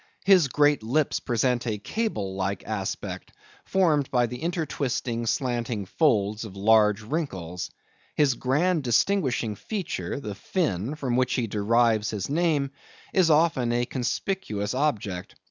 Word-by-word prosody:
His 185 -6 +6
great 145 0 +3
lips 135 +7 +1
present 125 0 0
a 110 -2 -1
cable 105 - -3
like 95 0 -2
aspect, 100 -3 -4 0.3
formed 160 -8 +2
by 125 -2 +2
the 125 +1 -6
intertwisting, 135 -8 -2
slanting 120 -4 -1
folds 105 - +1
of 105 -4 -9
large 105 0 +4
wrinkles. 95 - -4 0.5
His 145 -4 +3
grand 155 +8 +1
distinguishing 125 - +1
feature, 180 - -4
the 105 -7 -5
fin, 130 - -2
from 130 -5 -1
which 130 -1 +1
he 125 - 0
derives 110 +1 +2
his 105 +3 -4
name, 150 -4 +1 0.4
is 185 -3 +4
often 150 -6 +3
a 120 +1 +1
conspicuous 120 - -2
object. 105 -10 -2
125 Hz, 130 wpm, -26 LUFS, 105-150 Hz, 0.5 s, His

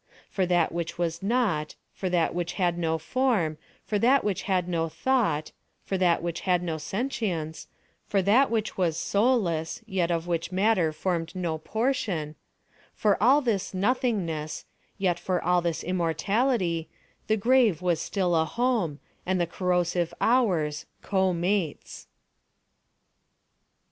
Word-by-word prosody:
For 185 -2 0
that 175 -2 +2
which 170 0 -4
was 170 -1 -2
not—for 195 -5 -1
that 175 -2 +1
which 175 0 -2
had 175 -3 +1
no 165 -2 0
form—for 205 -1 -1
that 260 +6 +4
which 205 -4 -1
had 180 -2 +1
no 165 -2 -1
thought—for 195 - -2
that 175 -3 +2
which 170 -1 -3
had 180 -2 +1
no 160 -2 -3
sentience—for 195 - -3
that 235 +8 +4
which 220 -3 -2
was 165 -3 +1
soulless, 200 -8 0
yet 180 -3 0
of 165 -1 -1
which 170 0 -2
matter 185 -3 +2
formed 170 +1 -2
no 170 -4 -2
portion—for 205 - -3
all 275 +4 +5
this 210 -7 -1
nothingness, 185 -8 -1 0.3
yet 180 -3 0
for 180 0 -1
all 180 +1 +3
this 170 -2 -2
immortality, 180 - 0 0.4
the 220 - +2
grave 225 - +3
was 175 -3 +1
still 180 -4 0
a 160 - +4
home, 220 - 0 0.2
and 185 0 0
the 175 - +2
corrosive 175 -1 0
hours, 180 - +1 0.2
co 190 -2 +1
mates. 175 -2 -2
180 Hz, 130 wpm, -27 LUFS, 165-210 Hz, 0.4 s, all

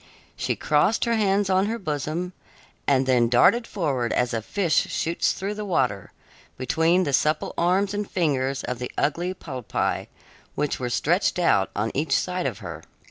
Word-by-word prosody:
She - - -1
crossed 155 +11 +2
her 235 - +1
hands 205 -2 +2
on 190 +1 +2
her 230 +2 -2
bosom, 160 0 -3 0.5
and 135 -2 +3
then 125 -3 +3
darted 230 - +4
forward 135 - -1
as 125 -1 0
a 115 - -1
fish 175 - +1
shoots 165 +1 0
through 200 +2 -4
the 210 0 -5
water, 125 - -1 0.5
between 165 +8 +2
the 140 - -2
supple 155 +3 +1
arms 190 +4 +1
and 205 0 -3
fingers 135 -6 0
of 125 -1 -4
the 125 - -5
ugly 175 +5 0
polypi, 130 - -3 0.5
which 150 0 -1
were 125 -1 -2
stretched 165 - +1
out 100 - +3
on 105 +2 -1
each 145 -1 +1
side 180 -1 -1
of - - -4
her. - - -7
160 Hz, 170 wpm, -24 LUFS, 130-190 Hz, 0.5 s, darted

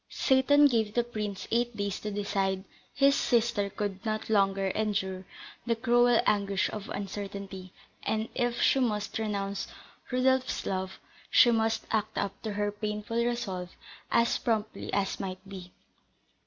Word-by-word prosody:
Seyton 285 +2 +4
gave 225 -6 +2
the 240 - +3
prince 210 -4 -5
eight 240 -1 0
days 200 -1 -2
to 210 - -4
decide; 200 -2 -1 0.3
his 275 0 +4
sister 230 -6 +1
could 200 -1 -4
not 215 0 -2
longer 195 -2 +2
endure 190 -3 -1 0.4
the 230 - +2
cruel 240 0 +4
anguish 200 -2 +1
of 210 -2 -6
uncertainty, 195 -1 -6 0.3
and, 220 0 -1
if 240 -1 0
she 270 - +4
must 215 -4 -1
renounce 200 -2 -2 0.4
Rodolph's 260 +1 +1
love, 190 0 -3 0.3
she 240 - +6
must 225 -1 +1
act 215 -1 -1
up 195 - -2
to 215 -2 -4
her 205 0 0
painful 210 +2 -2
resolve 195 -7 -2 0.4
as 235 0 +2
promptly 220 -2 -2
as 200 -1 0
might 185 0 -6
be. 185 -2 -9
210 Hz, 140 wpm, -29 LUFS, 195-235 Hz, 0.4 s, she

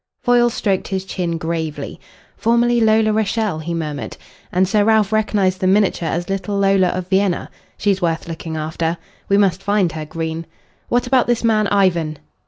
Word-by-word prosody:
Foyle 240 0 +4
stroked 195 -4 -1
his 190 -1 -3
chin 175 -3 -2
gravely. 160 -2 -4 0.4
"Formerly 235 +1 +2
Lola 220 -1 +3
Rachael," 215 -4 0
he 160 +2 -5
murmured. 150 -3 -4 0.3
"And 185 +1 +2
Sir 210 +1 +2
Ralph 220 -1 +3
recognised 205 -4 +1
the 185 - +1
miniature 190 -4 +2
as 175 +1 -2
little 195 +1 -2
Lola 195 -1 +3
of 180 0 -3
Vienna. 190 -1 0 0.3
She's 200 -2 0
worth 165 -2 -1
looking 165 -1 -5
after. 160 +2 -2 0.3
We 200 - +4
must 195 -3 +2
find 200 -3 +1
her, 155 -1 -5
Green. 160 +1 -4 0.4
What 245 +1 +1
about 250 0 +2
this 240 -1 +1
man 215 -2 +3
Ivan?" 175 -7 +1
190 Hz, 170 wpm, -19 LUFS, 165-215 Hz, 0.4 s, Foyle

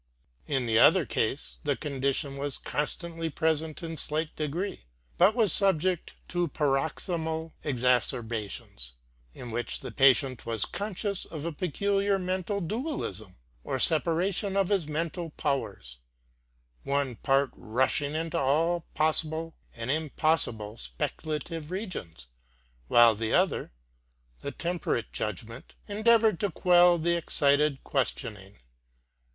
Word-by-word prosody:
In 135 -4 0
the 115 -1 +3
other - - +6
case - - -2
the - - +1
condition 140 0 -1
was 140 0 -3
constantly 165 +2 -3
present 160 +1 -1
in 165 -1 -5
slight 155 +1 -1
degree, 155 - -3 0.3
but 195 +5 +6
was 220 -8 +4
subject 185 -3 +2
to 175 -1 0
paroxysmal 160 +3 -1
exacerbations, 115 - -1 0.4
in 120 -2 -7
which 120 +2 -2
the - - -6
patient 135 -1 +4
was 115 -3 0
conscious 200 -1 -3
of 155 -1 -7
a 170 - -1
peculiar 195 +5 0
mental 185 +2 -2
dualism 200 - -4 0.3
or 135 - -2
separa 165 +6 +3
tion 195 +1 -1
of 195 -2 +2
his 195 -7 +1
mental 165 +2 -3
powers; 135 - -3 0.8
one 140 -3 -1
part 135 -1 +2
rushing 130 +5 0
into 160 0 -1
all 165 +5 +1
possible 160 +1 +1 0.2
and 115 +1 -3
impossible 145 -8 0
speculative 150 - -4
regions, 180 - -5 0.6
while 120 - +7
the 110 +1 -1
other, 185 - +1 0.7
the - - -4
temperate 170 -10 -2
judgment, 115 - -5
endeavoured 220 -1 +3
to 205 - 0
quell 175 0 +5
the 170 +1 +1
excited 145 -3 +2
questioning. 105 -7 -3
155 Hz, 120 wpm, -28 LUFS, 130-175 Hz, 0.8 s, while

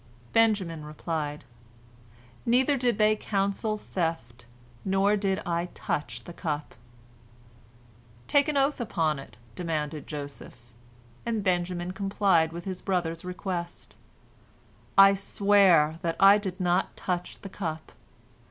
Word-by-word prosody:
Benjamin 200 -8 +2
replied: 150 -1 -4 1.0
"Neither 260 +4 +3
did 245 -4 +1
they 215 0 +4
counsel 200 +1 -1
theft, 160 - -4 0.4
nor 195 +2 +2
did 195 -2 -1
I 170 0 -1
touch 145 - -3
the 170 - -10
cup." 150 -4 -4 1.5
"Take 285 0 +3
an 300 -2 0
oath 275 -1 +1
upon 160 -10 0
it," 135 - -12 0.2
demanded 155 -3 -3
Joseph, 145 -2 -7 0.7
and 225 -3 -2
Benjamin 175 -1 0
complied 195 -4 +2
with 170 +1 -7
his 185 -2 -5
brother's 170 -4 -1
request: 180 -1 -5 1.0
"I 195 0 +9
swear 195 -5 +3
that 165 -1 -1
I 200 +1 +8
did 190 -2 -5
not 180 0 0
touch 180 -1 -3
the 195 - -8
cup! 160 -5 -5
180 Hz, 115 wpm, -27 LUFS, 165-200 Hz, 1.5 s, I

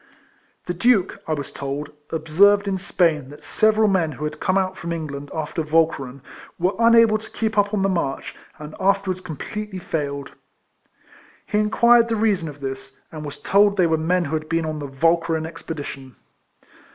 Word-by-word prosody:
The 175 - -2
Duke, 200 0 +2
I 160 - 0
was 145 -2 -6
told, 140 +2 -5 0.2
observed 195 +6 +3
in 190 -1 -1
Spain 165 -7 +1
that 145 - -13
several 215 0 +3
men 175 -6 +1
who 140 - -8
had 150 0 -4
come 185 +1 +1
out 190 -1 0
from 170 -2 -6
England 145 -4 -5
after 160 +1 -3
Walcheren 150 -4 0 0.4
were 180 +3 +1
unable 230 -2 +5
to 220 - -11
keep 220 -1 -2
up 205 -1 +2
on 205 -3 0
the - - +3
march, 170 -8 -2 0.2
and 150 0 -9
afterwards 195 -1 +1
com 160 -5 -7
pletely 210 +1 -6
failed. 140 -4 -4 1.1
He 210 - 0
inquired 235 +2 +4
the 230 - 0
reason 205 -7 +1
of 145 -1 -12
this, 135 0 -6
and 155 -1 -7
was 145 -1 -7
told 200 0 +3
they 180 - +4
were 160 -1 +2
men 175 +3 +1
who 150 - -5
had 155 0 -4
been 165 0 0
on 155 -1 -3
the 145 - -5
Walcheren 165 +3 +1
expedition. 145 -5 -7
165 Hz, 180 wpm, -22 LUFS, 150-200 Hz, 1.1 s, unable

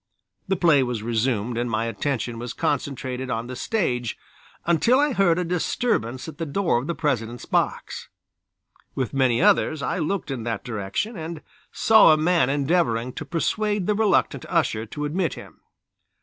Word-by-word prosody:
The 190 - +1
play 165 -6 +4
was 120 -4 -2
resumed 115 0 0
and 120 0 -1
my 110 0 0
attention 120 -1 -2
was 120 -1 -5
concentrated 130 -2 -2
on 115 0 -2
the 130 +1 -7
stage 125 - -1 0.5
until 170 - +3
I 290 -1 +2
heard 185 -6 +3
a 180 - 0
disturbance 165 - -1
at 155 -2 -9
the 165 - -2
door 165 -4 +1
of 130 - -6
the 170 - -2
President's 120 -5 -2
box. - - -2 0.9
With 130 -1 -2
many 130 +1 +2
others 175 -7 +3
I - - -1
looked 165 -1 -2
in 130 -3 -3
that 115 -2 -3
direction, 110 - -3
and 165 -2 -6 0.3
saw 220 -6 +6
a - - +3
man 160 -4 +2
endeavoring 135 -5 +1
to 150 - -6
persuade 205 +5 -1
the 210 - +2
reluctant 210 -1 +1
usher 110 +1 0
to 150 +6 -4
admit 165 +3 -1
him. - - -13
140 Hz, 165 wpm, -24 LUFS, 120-175 Hz, 0.9 s, saw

